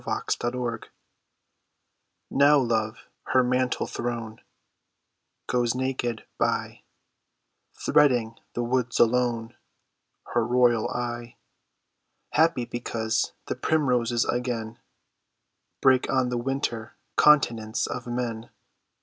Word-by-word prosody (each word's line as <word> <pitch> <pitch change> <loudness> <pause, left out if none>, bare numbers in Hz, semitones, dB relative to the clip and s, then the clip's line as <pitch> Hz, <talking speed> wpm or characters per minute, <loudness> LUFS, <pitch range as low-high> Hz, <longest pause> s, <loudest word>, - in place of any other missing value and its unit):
VENUS - - -1
IN 120 +1 -1
ARDEN 120 -2 -4 1.4
Now 145 +2 +5
love, 110 -4 -1 0.3
her 130 - +6
mantle 125 0 0
thrown, 115 -2 -5 1.0
Goes 120 -1 0
naked 125 -3 -2
by, - - -1 0.9
Threading 120 -6 +2 0.2
the 120 - -1
woods 125 0 0
alone, 120 -1 +2 0.8
Her 120 - +3
royal 120 -1 +3
eye 120 -1 -4 1.0
Happy 155 -5 +3
because 115 -2 -2
the - - -2
primroses 125 -6 +1
again 120 -2 -3 1.0
Break 130 -1 +4
on 130 -2 +2
the 125 - -1
winter 120 -3 -3 0.2
continence 115 -7 +3
of 125 -1 -5
men. 120 -2 -3
120 Hz, 95 wpm, -26 LUFS, 115-125 Hz, 1.4 s, her